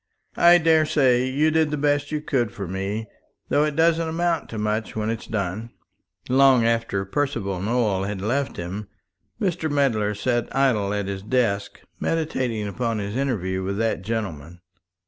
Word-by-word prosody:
I 175 +1 +7
daresay 155 -6 +3
you 150 +4 +2
did 160 -1 +2
the 150 - -2
best 145 0 +1
you 150 -1 -1
could 120 -7 0
for 100 -4 -6
me, 100 +4 -3 0.4
though 145 - +3
it 150 -1 -1
doesn't 165 0 +2
amount 165 -1 -1
to 115 - -6
much 105 +1 -2
when 110 0 -1
it's 115 - -5
done." 105 +2 -3 0.6
Long 130 -2 +5
after 115 -4 0
Percival 100 -5 -2
Nowell 105 -3 0
had 100 -1 -4
left 130 +8 -1
him, 95 +4 -5 0.5
Mr. 180 -5 -1
Medler 115 -8 +1
sat 120 +3 0
idle 120 -8 +2
at 105 -1 -1
his 95 0 -4
desk 105 -3 -1 0.2
meditating 130 -10 -1
upon 115 +2 -2
his 100 +1 -4
interview 100 -9 -1
with 100 +1 -3
that 115 -5 0
gentleman. 90 -6 -5
115 Hz, 160 wpm, -23 LUFS, 100-145 Hz, 0.6 s, I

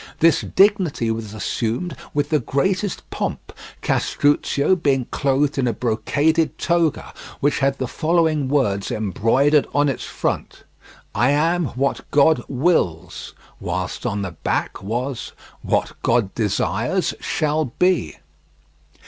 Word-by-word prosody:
This 165 +1 +4
dignity 185 - +2
was 110 -1 -5
assumed 120 - -2 0.2
with 145 0 -1
the 155 - +2
greatest 185 - -1
pomp, - - -4 0.3
Castruccio 145 +3 +2
being 135 -7 +1
clothed 140 +1 +1
in 130 - +1
a 120 - +1
brocaded 145 +8 +1
toga, 170 -3 0 0.3
which 145 +1 +1
had 135 0 +1
the 130 - -2
following 160 -1 +1
words 115 -9 0
embroidered 115 - +2
on 145 0 +3
its 135 - -3
front: - - -3 0.5
"I 120 +6 +2
am 165 +4 +2
what 140 +1 -1
God 145 -2 +4
wills." 125 - -1 0.2
Whilst 90 +1 -4
on 105 -3 -2
the 95 - -4
back - - -2
was: 120 +5 -4 0.3
"What - - 0
God 115 -4 +1
desires 110 - 0
shall 155 -2 0
be." 130 - 0
140 Hz, 125 wpm, -21 LUFS, 115-160 Hz, 0.5 s, This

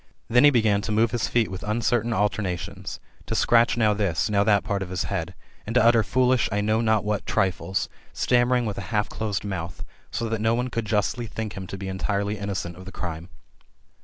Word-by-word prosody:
Then 125 +3 +5
he - - +9
began 110 -6 +3
to 105 - -4
move 110 +2 +3
his 120 -1 0
feet 115 -3 +1
wiA 95 - -6
uncertain 115 +1 +1
alternations; 100 -4 -2 0.3
to - - -2
scratch 120 0 +4
now 110 -2 +3
this, 100 -1 0
now 100 -1 +3
that 105 -1 +3
pait 100 -1 -2
of 95 - -4
bk 90 -1 -2
head; 90 -2 -3 0.3
and 115 - -4
to 125 - +5
utter 115 -1 +6
foolishly 125 -3 +2
I - - +2
know 110 +2 +1
not 110 -2 +2
what 105 -1 -2
triflesi 95 -2 0 0.2
stammering 125 0 +2
with 105 -2 -3
a 90 - -7
half 105 -1 0
dosed 105 -2 -3
mouth; 90 -3 -5 0.2
so 115 - -2
that 110 -1 -2
no 115 +1 +2
one 125 +1 -2
could 115 -1 -2
justly 110 +3 0
think 110 0 -5
him 95 -1 -6
to 100 - -6
be 95 0 -6
entitely 100 +2 -2
innocent 95 -4 -4
of 95 - -11
the 95 - -8
crime. 85 -1 -6
105 Hz, 215 wpm, -25 LUFS, 95-115 Hz, 0.3 s, he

